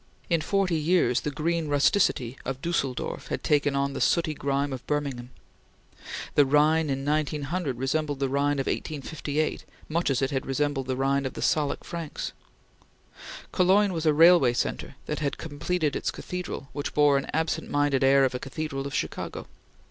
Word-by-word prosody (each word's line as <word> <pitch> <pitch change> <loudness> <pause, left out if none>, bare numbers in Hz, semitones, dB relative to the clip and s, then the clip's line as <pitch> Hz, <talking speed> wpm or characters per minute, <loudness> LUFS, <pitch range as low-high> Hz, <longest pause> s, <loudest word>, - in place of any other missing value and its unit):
In 165 -2 +3
forty 190 -2 +1
years, 155 -6 +2
the - - -2
green 160 +2 -1
rusticity 145 -4 +2
of 135 0 -4
Dusseldorf 135 -6 -2
had - - -4
taken 145 -1 +2
on 140 0 0
the - - -4
sooty 165 -3 +2
grime 140 -1 -1
of 130 - -6
Birmingham. 140 -5 -2 1.0
The 145 - +6
Rhine 150 +3 +3
in 135 0 -2
1900 150 0 -1
resembled 145 +3 -1
the 135 0 0
Rhine 140 +2 +1
of 135 - -1
1858 150 0 -2 0.2
much 170 +1 0
as 135 0 +1
it 135 -1 0
resembled 135 -1 -1
the 130 - -1
Rhine 135 +1 +1
of - - -7
the - - -4
Salic 150 -2 +1
Franks. 165 -3 -5 1.2
Cologne 190 +2 +3
was 165 -1 -1
a - - +6
railway 165 -6 +6
centre 120 - -3
that 150 - -3
had 145 -2 -2
completed 160 0 -2
its - - -1
cathedral 180 -6 -5
which 145 - -4
bore 145 -2 +5
an - - -7
absent 160 +1 -1
minded 145 -2 +2
air 135 0 +5
of 130 - -1
a 125 - -3
cathedral 135 0 -4
of 140 - -5
Chicago. - - -3
145 Hz, 170 wpm, -27 LUFS, 135-160 Hz, 1.2 s, The